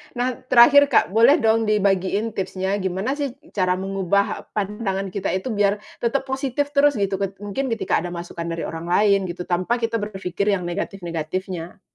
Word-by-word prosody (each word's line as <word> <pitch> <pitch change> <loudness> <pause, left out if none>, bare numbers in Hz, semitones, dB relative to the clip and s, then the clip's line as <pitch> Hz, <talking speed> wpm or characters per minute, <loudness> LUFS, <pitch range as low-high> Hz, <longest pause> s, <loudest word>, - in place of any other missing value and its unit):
Nah, 245 0 -1
terakhir 280 +4 +7
Kak, 275 - +3
boleh 230 +7 +6
dong 225 0 +3
dibagiin 200 +1 +1
tipsnya, 190 0 -2
gimana 190 +9 -2
sih, 275 -4 -2 0.2
cara 185 -2 +1
mengubah 195 +1 -1
pandangan 195 -2 -2
kita 200 0 -3
itu 190 +7 -3
biar 205 0 +1 0.2
tetap 250 +3 0
positif 270 +1 -2
terus 290 0 +4
gitu 195 -2 -1
ket 195 -1 -2
mungkin 235 +7 -2
ketika 230 -2 0
ada 175 - -4
masukan 170 0 -6
dari 165 0 -3
orang 165 +1 -6
lain 200 +1 +3
gitu 175 0 -5
tanpa 180 +6 0
kita 230 -1 -1
berpikir 200 -1 -1
yang 180 - -4
negatif-negatifnya? 175 -1 -4
200 Hz, 165 wpm, -22 LUFS, 185-230 Hz, 0.2 s, terakhir